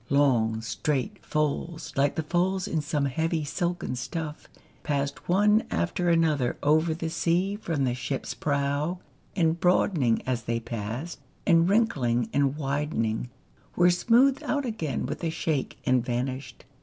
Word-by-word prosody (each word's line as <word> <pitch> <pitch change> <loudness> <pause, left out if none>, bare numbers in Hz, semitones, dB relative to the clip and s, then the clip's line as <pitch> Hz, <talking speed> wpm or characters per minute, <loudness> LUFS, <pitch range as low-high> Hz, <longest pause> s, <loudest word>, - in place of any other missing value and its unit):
Long, 120 -6 +3
straight 150 - -2
folds, 155 +2 -2
like 140 +1 +2
the 160 - -1
folds 185 +4 0
in 160 - 0
some 150 -1 -1
heavy 160 +4 0
silken 175 -1 -2
stuff, 150 +5 -5 0.3
passed 140 +1 -2
one 210 +4 +4
after 130 - 0
another 155 -7 +2
over 155 +2 +3
the 165 0 -3
sea 180 +5 +1
from 165 -9 -2
the 125 -2 +1
ship's 130 +2 -3
prow, 145 +4 -1 0.4
and 165 -2 +2
broadening 165 - +2
as 125 -3 -2
they 115 0 0
passed, 115 +8 -5 0.3
and 170 -1 +4
wrinkling 130 - +2
and 140 0 +2
widening, 135 -6 -1 0.5
were 175 0 +5
smoothed 245 +9 +4
out 285 -1 -1
again 165 - -2
with 150 +6 -5
a 165 - +1
shake, 155 -3 -2
and 125 -2 +3
vanished. 130 +2 -4
150 Hz, 145 wpm, -27 LUFS, 130-175 Hz, 0.5 s, were